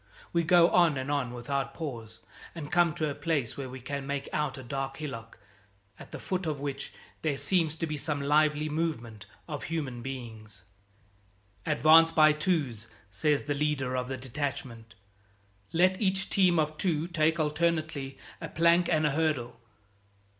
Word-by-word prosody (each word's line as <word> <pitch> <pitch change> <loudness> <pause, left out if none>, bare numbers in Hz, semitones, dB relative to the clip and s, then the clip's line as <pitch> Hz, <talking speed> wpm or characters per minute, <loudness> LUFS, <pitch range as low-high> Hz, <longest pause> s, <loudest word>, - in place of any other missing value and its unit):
We 170 - +3
go 170 +1 +5
on 170 -5 +4
and 130 +2 -3
on 140 -4 0
without 135 +3 -3
pause, 120 -9 -7 0.3
and 155 -3 -7
come 170 -1 +3
to 155 -2 -1
a - - -3
place 145 -5 -1
where 135 -2 -5
we 130 +1 -8
can 135 +2 -5
make 140 -1 -3
out 150 -3 -1
a 130 - -8
dark 135 +1 -4
hillock, 115 -7 -7 0.6
at - - -11
the - - -7
foot 185 -2 -3
of 150 -3 -2
which 140 -1 -4 0.3
there 150 -3 0
seems 165 -2 +1
to 165 - -2
be 155 -1 -3
some 145 0 -2
lively 150 +1 +2
movement 120 -10 -3 0.2
of 150 -3 -5
human 145 -7 -3
beings. 110 -6 -8 1.0
"Advance 160 +2 +6
by 155 -2 +6
twos," 150 - -1 0.2
says 145 +8 +1
the 145 - -1
leader 140 -3 -1
of 125 0 -1
the 130 0 -4
detachment. 125 -3 -5 0.8
"Let 185 +4 +3
each 190 -1 0
team 185 -3 +4
of 155 0 0
two 165 -3 0
take 160 -1 +1
alternately 155 -3 -1 0.2
a - - -5
plank 170 +1 +3
and 155 -2 +2
a 150 - +2
hurdle." 140 -6 -1
150 Hz, 165 wpm, -29 LUFS, 130-160 Hz, 1.0 s, Advance